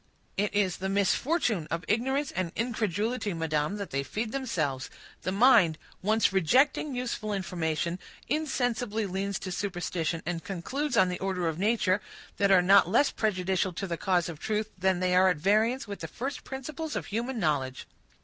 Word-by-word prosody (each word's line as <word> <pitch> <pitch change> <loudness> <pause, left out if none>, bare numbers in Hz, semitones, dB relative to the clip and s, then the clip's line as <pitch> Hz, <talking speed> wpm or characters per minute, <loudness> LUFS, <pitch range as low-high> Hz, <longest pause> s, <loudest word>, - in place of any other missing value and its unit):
"It 205 +1 0
is 195 -4 +2
the 190 +1 -3
misfortune 200 - +1
of 165 +1 -3
ignorance 265 +6 0
and 180 -2 -2
incredulity, 220 -2 -1
madam, 155 +2 -1
that 200 -2 -6
they 135 - 0
feed 215 - -3
themselves. 155 - -2 0.3
The 185 - -2
mind, 200 -7 +5 0.2
once 215 0 +2
rejecting 260 - +3
useful 235 -4 -3
information, 170 -2 -2 0.3
insensibly 245 -7 -1
leans 195 +1 -2
to 185 - -6
superstition 175 -3 -2
and 170 0 -3
conclusions 255 - -2
on 185 -1 +5
the 180 - -4
order 185 -3 -1
of 160 0 -2
nature, 205 -2 +2 0.4
that 200 -1 +3
are 185 -2 +6
not 195 -1 +6
less 240 +8 +4
prejudicial 190 -3 0
to 195 - -4
the 175 -3 -2
cause 175 0 +1
of 165 -4 -7
truth, 215 +2 -2
than 185 -1 +1
they 180 0 +2
are 185 +1 +6
at 180 - +1
variance 215 - +2
with 200 -1 -6
the - - -5
first 270 +3 -5
principles 300 +4 -5
of - - -2
human 235 +4 -3
knowledge." 145 - -1
195 Hz, 170 wpm, -28 LUFS, 175-230 Hz, 0.4 s, are